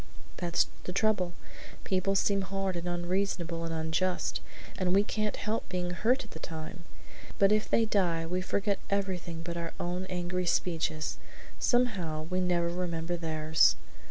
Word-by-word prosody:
"That's 175 Hz, -1 st, +2 dB, 0.2 s
the -, -, -2 dB
trouble. 195 Hz, -4 st, +2 dB, 0.5 s
People 190 Hz, +1 st, +1 dB
seem 195 Hz, 0 st, +3 dB
hard 195 Hz, -1 st, -2 dB
and 170 Hz, +1 st, -3 dB
unreasonable 175 Hz, -1 st, -1 dB
and 165 Hz, -, -3 dB
unjust, 165 Hz, +3 st, 0 dB, 0.3 s
and 185 Hz, 0 st, +1 dB
we 200 Hz, -, +6 dB
can't 215 Hz, -1 st, -1 dB
help 215 Hz, +2 st, -2 dB
being 180 Hz, -1 st, -1 dB
hurt 230 Hz, +9 st, +2 dB
at -, -, -14 dB
the 160 Hz, -, -8 dB
time, 160 Hz, +2 st, -7 dB, 0.5 s
but 195 Hz, 0 st, +5 dB
if 215 Hz, 0 st, +2 dB
they 230 Hz, -, +4 dB
die 175 Hz, -6 st, +2 dB
we 180 Hz, +2 st, -1 dB
forget 200 Hz, +1 st, 0 dB
everything 185 Hz, -4 st, -1 dB
but 170 Hz, 0 st, -4 dB
our 170 Hz, -1 st, -4 dB
own 180 Hz, +2 st, -2 dB
angry 180 Hz, 0 st, -1 dB
speeches; 160 Hz, -3 st, 0 dB, 0.4 s
somehow 190 Hz, -11 st, +2 dB
we 185 Hz, 0 st, +1 dB
never 175 Hz, -1 st, +2 dB
remember 175 Hz, -1 st, -2 dB
theirs. 160 Hz, -2 st, +3 dB
180 Hz, 155 wpm, -31 LUFS, 170-195 Hz, 0.5 s, we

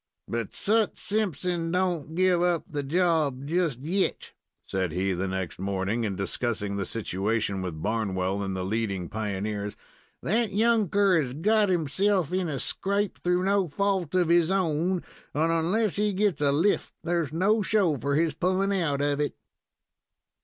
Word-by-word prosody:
"But 115 Hz, -2 st, -3 dB
Sut 220 Hz, +1 st, +1 dB
Simpson 180 Hz, -5 st, -1 dB
don't 175 Hz, -4 st, -1 dB
give 180 Hz, -1 st, +3 dB
up 175 Hz, -2 st, +2 dB
the 145 Hz, -1 st, -3 dB
job 150 Hz, -3 st, +1 dB
just 160 Hz, -5 st, 0 dB
yet," 185 Hz, +7 st, -1 dB, 0.3 s
said 95 Hz, -3 st, -2 dB
he, 95 Hz, +3 st, 0 dB
the 90 Hz, +2 st, -2 dB
next 95 Hz, -3 st, -4 dB
morning, 100 Hz, +4 st, -1 dB
in 100 Hz, -2 st, -2 dB
discussing 100 Hz, +1 st, -2 dB
the 100 Hz, -2 st, -2 dB
situation 105 Hz, -1 st, -1 dB
with 85 Hz, -4 st, -5 dB
Barnwell 100 Hz, -3 st, -1 dB
and 95 Hz, -1 st, -3 dB
the 95 Hz, -, -2 dB
leading 100 Hz, -4 st, -2 dB
pioneers. 105 Hz, -1 st, -3 dB, 0.5 s
"That 220 Hz, +2 st, +1 dB
younker 205 Hz, -5 st, +3 dB
has 125 Hz, -3 st, -4 dB
got 210 Hz, +5 st, +3 dB
himself 180 Hz, +2 st, +1 dB
in 185 Hz, -2 st, 0 dB
a 140 Hz, -, -2 dB
scrape, 200 Hz, +8 st, -1 dB
through 180 Hz, +1 st, +1 dB
no 195 Hz, -1 st, +2 dB
fault 185 Hz, +1 st, -1 dB
of 180 Hz, -3 st, +3 dB
his 170 Hz, -1 st, +4 dB
own, 180 Hz, -1 st, +1 dB, 0.3 s
and 160 Hz, +3 st, +2 dB
onless 180 Hz, +6 st, +1 dB
he 210 Hz, 0 st, +1 dB
gets 195 Hz, -5 st, +1 dB
a 140 Hz, -1 st, +3 dB
lift 165 Hz, +9 st, +1 dB
there's 170 Hz, -3 st, 0 dB
no 200 Hz, +7 st, +2 dB
show 195 Hz, -6 st, +2 dB
for 140 Hz, +4 st, 0 dB
his 160 Hz, 0 st, +2 dB
pullin' 185 Hz, +5 st, +1 dB
out 165 Hz, -8 st, 0 dB
of 145 Hz, 0 st, 0 dB
it." 150 Hz, -, -1 dB
160 Hz, 160 wpm, -27 LUFS, -, 0.5 s, his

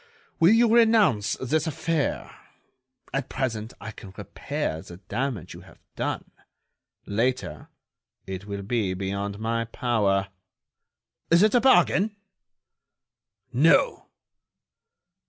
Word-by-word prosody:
Will 165 Hz, -, +6 dB
you 230 Hz, 0 st, +4 dB
renounce 220 Hz, -, +4 dB
this 155 Hz, +5 st, 0 dB
affair? 160 Hz, 0 st, -2 dB, 0.8 s
At 135 Hz, -1 st, -2 dB
present 115 Hz, -3 st, -3 dB
I 110 Hz, -, -7 dB
can 95 Hz, -3 st, -12 dB
repair 80 Hz, -, -4 dB
the 85 Hz, -, -11 dB
damage 115 Hz, -, -4 dB
you -, -, -11 dB
have -, -, -17 dB, 0.2 s
done; -, -, -3 dB, 0.7 s
later 120 Hz, +5 st, -2 dB, 0.6 s
it 95 Hz, +1 st, -6 dB
will 100 Hz, -1 st, -5 dB
be 100 Hz, -3 st, -1 dB
beyond 100 Hz, +1 st, -3 dB
my 115 Hz, +1 st, -1 dB
power. 105 Hz, -5 st, 0 dB, 1.0 s
Is 170 Hz, +3 st, +5 dB
it 215 Hz, -, +4 dB
a 245 Hz, -, +4 dB
bargain?" 205 Hz, -3 st, +4 dB, 1.4 s
"No." -, -, +3 dB
115 Hz, 105 wpm, -25 LUFS, 100-165 Hz, 1.4 s, Will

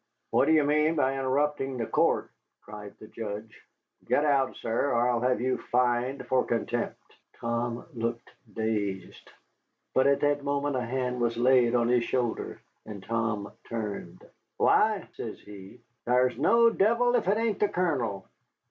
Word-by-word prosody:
"What -, -, +4 dB
do 155 Hz, -, +2 dB
you 155 Hz, -2 st, +5 dB
mean 150 Hz, +2 st, +2 dB
by 135 Hz, -3 st, +2 dB
interrupting 135 Hz, 0 st, -1 dB
the 115 Hz, -, -2 dB
court?" -, -, +1 dB, 0.3 s
cried 105 Hz, -1 st, -10 dB
the -, -, -12 dB
judge. 110 Hz, 0 st, -7 dB, 0.4 s
"Get 145 Hz, -, +2 dB
out, 140 Hz, -3 st, +2 dB
sir, 115 Hz, +5 st, -1 dB
or 120 Hz, +1 st, +2 dB
I'll 120 Hz, -1 st, +1 dB
have 125 Hz, -2 st, +1 dB
you 130 Hz, +1 st, 0 dB
fined 125 Hz, +2 st, +1 dB
for 130 Hz, -1 st, +2 dB
contempt." 115 Hz, -2 st, -2 dB, 0.4 s
Tom 120 Hz, 0 st, -3 dB
looked 115 Hz, 0 st, -3 dB, 0.2 s
dazed. 105 Hz, -4 st, -3 dB, 0.6 s
But 130 Hz, +1 st, +4 dB
at 140 Hz, 0 st, +3 dB
that 145 Hz, -1 st, +1 dB
moment 140 Hz, 0 st, -1 dB
a 125 Hz, -, 0 dB
hand 125 Hz, 0 st, -2 dB
was 115 Hz, -1 st, 0 dB
laid 125 Hz, -1 st, +4 dB
on 120 Hz, -1 st, +2 dB
his 120 Hz, 0 st, +3 dB
shoulder, 120 Hz, -2 st, -2 dB, 0.2 s
and 100 Hz, -3 st, -9 dB
Tom 115 Hz, -3 st, -2 dB, 0.2 s
turned. 105 Hz, -3 st, -5 dB, 0.3 s
"Why," -, -, +3 dB
says -, -, -6 dB
he, 100 Hz, +3 st, -12 dB, 0.2 s
"thar's 125 Hz, +1 st, +2 dB
no 230 Hz, 0 st, +4 dB
devil 235 Hz, +4 st, +2 dB
if 240 Hz, -6 st, +1 dB
it 200 Hz, +2 st, +3 dB
ain't 225 Hz, -3 st, 0 dB
the 210 Hz, -, +2 dB
Colonel. 130 Hz, -, -1 dB
125 Hz, 155 wpm, -28 LUFS, 115-140 Hz, 0.6 s, you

